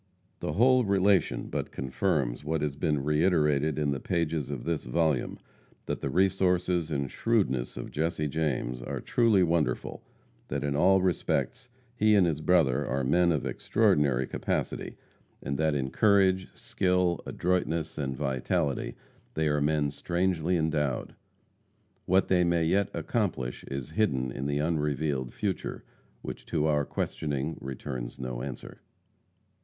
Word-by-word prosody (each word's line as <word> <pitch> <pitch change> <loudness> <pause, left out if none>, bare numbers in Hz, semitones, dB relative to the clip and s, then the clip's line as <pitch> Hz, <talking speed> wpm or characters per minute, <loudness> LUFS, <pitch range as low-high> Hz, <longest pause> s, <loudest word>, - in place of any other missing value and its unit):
The 75 - -3
whole 125 +5 +5
relation 100 - +2
but - - -4
confirms 65 -1 -1
what 80 0 -1
has 75 -2 -2
been 75 -1 0
reiterated 75 -2 +2
in 75 -2 +1
the 70 - -2
pages 80 -3 -1
of 70 -4 -4
this 85 -2 -2
volume, 75 +1 0 0.5
that - - -3
the - - -2
resources 90 -2 +2
and 70 -3 -1
shrewdness 95 - 0
of - - -6
Jesse 75 0 -1
James 70 -5 -2
are - - -4
truly 115 -6 +3
wonderful; 85 -2 0 0.5
that - - -3
in 70 -1 -1
all 95 +4 +4
respects 95 +6 -1 0.3
he 110 -2 +4
and 95 -3 +5
his 80 -3 -1
brother 80 -8 +3
are 65 +1 -1
men 85 +6 +3
of 75 -4 -1
extraordinary 75 - +2
capacity, - - -3 0.5
and 70 +1 -2
that 80 -2 +2
in 65 -1 -2
courage, 95 +2 +3
skill, 90 -2 0
adroitness, 85 -3 -1
and 65 -3 -3
vitality, 70 +2 -1 0.4
they 80 0 +1
are 75 0 +1
men 75 -1 +1
strangely 90 +2 0
endowed. 75 -5 -1 0.9
What 95 +1 +3
they 90 -1 +3
may 85 -1 +2
yet 100 +4 +2
accomplish 60 -1 -2
is 70 +1 -5
hidden 65 - 0
in 70 +3 -4
the 70 0 0
unrevealed 75 -4 -1
future, 95 -6 -3 0.4
which - - -7
to 80 -2 0
our 75 -2 +2
questioning 75 +1 -3
returns 65 -2 -6
no 65 -2 -5
answer. 70 -1 -8
80 Hz, 140 wpm, -28 LUFS, 70-90 Hz, 0.9 s, whole